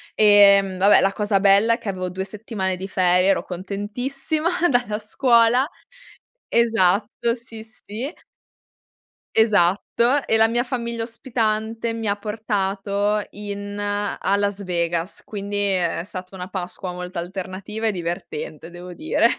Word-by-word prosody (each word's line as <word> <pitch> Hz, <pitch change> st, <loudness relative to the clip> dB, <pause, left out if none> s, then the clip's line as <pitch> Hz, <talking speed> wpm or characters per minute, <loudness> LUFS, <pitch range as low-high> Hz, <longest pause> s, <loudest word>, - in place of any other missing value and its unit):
Ehm, 200 Hz, -2 st, +6 dB
vabbè 200 Hz, +2 st, +6 dB
la 195 Hz, -, +2 dB
cosa 205 Hz, -1 st, +1 dB
bella 200 Hz, +3 st, +5 dB
è -, -, 0 dB
che 210 Hz, -, -6 dB
avevo 185 Hz, -1 st, -3 dB
2 190 Hz, +1 st, -4 dB
settimane 200 Hz, -2 st, -3 dB
di 190 Hz, +2 st, -6 dB
ferie, 180 Hz, -1 st, +3 dB
ero -, -, +2 dB
contentissima 245 Hz, -, -3 dB, 0.2 s
dalla 245 Hz, -5 st, +1 dB
scuola. 235 Hz, +4 st, +3 dB, 0.8 s
Esatto, 230 Hz, 0 st, +2 dB
sì, 230 Hz, -2 st, -9 dB
sì. 220 Hz, -, -7 dB, 1.2 s
Esatto. 205 Hz, -4 st, +4 dB, 0.4 s
E 225 Hz, -, +3 dB
la 225 Hz, -, +5 dB
mia 240 Hz, +2 st, +1 dB
famiglia 235 Hz, -2 st, -3 dB
ospitante, 225 Hz, -1 st, -2 dB
mi 225 Hz, -1 st, -4 dB
ha 200 Hz, -, +1 dB
portato 205 Hz, -1 st, -1 dB
in 205 Hz, 0 st, -6 dB
a 205 Hz, -1 st, -1 dB
Las 200 Hz, 0 st, -1 dB
Vegas, 170 Hz, -1 st, -2 dB
quindi 205 Hz, -1 st, -4 dB
è 185 Hz, -5 st, +1 dB
stata 185 Hz, 0 st, -8 dB
una 180 Hz, -1 st, -6 dB
Pasqua 185 Hz, -1 st, -5 dB
molto 180 Hz, 0 st, -7 dB
alternativa 190 Hz, +5 st, -4 dB
e -, -, +3 dB
divertente 170 Hz, -3 st, -5 dB
devo 175 Hz, +1 st, -10 dB
dire. 310 Hz, -, 0 dB
205 Hz, 135 wpm, -22 LUFS, 190-225 Hz, 1.2 s, Ehm